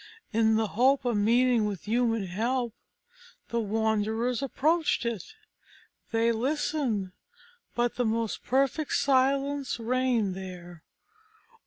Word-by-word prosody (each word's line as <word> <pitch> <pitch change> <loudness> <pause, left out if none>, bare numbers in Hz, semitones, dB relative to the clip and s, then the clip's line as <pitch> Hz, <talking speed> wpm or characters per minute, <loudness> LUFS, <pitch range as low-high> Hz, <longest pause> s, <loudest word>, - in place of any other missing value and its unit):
In 220 0 +3
the 220 -1 +1
hope 260 +6 +2
of 240 -2 +1
meeting 235 +2 +3
with 200 -4 -4
human 225 -1 +1
help, 235 +6 -1 0.8
the 235 - 0
wanderers 220 +2 0
approached 295 +1 +1
it. 230 -7 -4 0.8
They 230 +1 +2
listened, 250 -5 -1 0.6
but 240 0 0
the 245 - +1
most 225 0 -1
perfect 275 +3 0
silence 275 0 +1
reigned 240 -4 +1
there. 180 -3 -9
235 Hz, 110 wpm, -28 LUFS, 220-260 Hz, 0.8 s, In